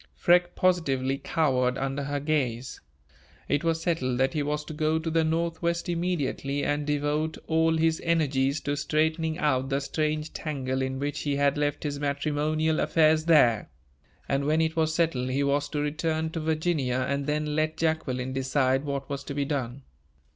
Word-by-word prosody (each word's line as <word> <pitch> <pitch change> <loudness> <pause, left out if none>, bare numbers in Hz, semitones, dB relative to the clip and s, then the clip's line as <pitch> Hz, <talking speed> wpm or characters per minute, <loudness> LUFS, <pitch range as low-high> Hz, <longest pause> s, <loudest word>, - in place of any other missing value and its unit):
Freke 175 0 +3
positively 135 -7 +1
cowered 130 -5 +1
under 135 +1 -2
her 145 0 -2
gaze. 135 -5 -2 0.7
It 145 +2 0
was 165 0 0
settled 130 -8 0
that 130 +3 +1
he 150 - 0
was 150 +1 -2
to 155 - -7
go 155 +1 +1
to 160 0 -3
the 165 0 +2
Northwest 170 +1 -1
immediately, 165 -5 -1
and 145 0 -1
devote 150 +2 0
all 160 0 +2
his 160 0 +1
energies 145 -4 +1
to 145 0 -1
straightening 160 +2 0
out 135 -6 +1
the 135 0 +1
strange 155 +2 -2
tangle 135 -4 -3
in 130 0 -2
which 145 +1 -3
he 145 -1 -1
had 140 0 +2
left 145 -1 -1
his 145 -2 -3
matrimonial 150 +2 0
affairs 155 -1 +3
there; 125 - +4 0.6
and, 140 0 0
when 155 +2 +2
it 160 0 +1
was 160 -1 +1
settled, 145 -7 +1
he 135 +2 0
was 140 +1 +1
to 150 - -2
return 155 +2 -1
to 165 - -3
Virginia, 155 -5 0
and 140 0 -2
then 150 0 -1
let 155 0 0
Jacqueline 130 -6 -1
decide 135 0 +1
what 140 -1 -3
was 140 0 -4
to 140 - -5
be 145 -1 0
done. 135 -2 -3
150 Hz, 175 wpm, -27 LUFS, 140-160 Hz, 0.7 s, there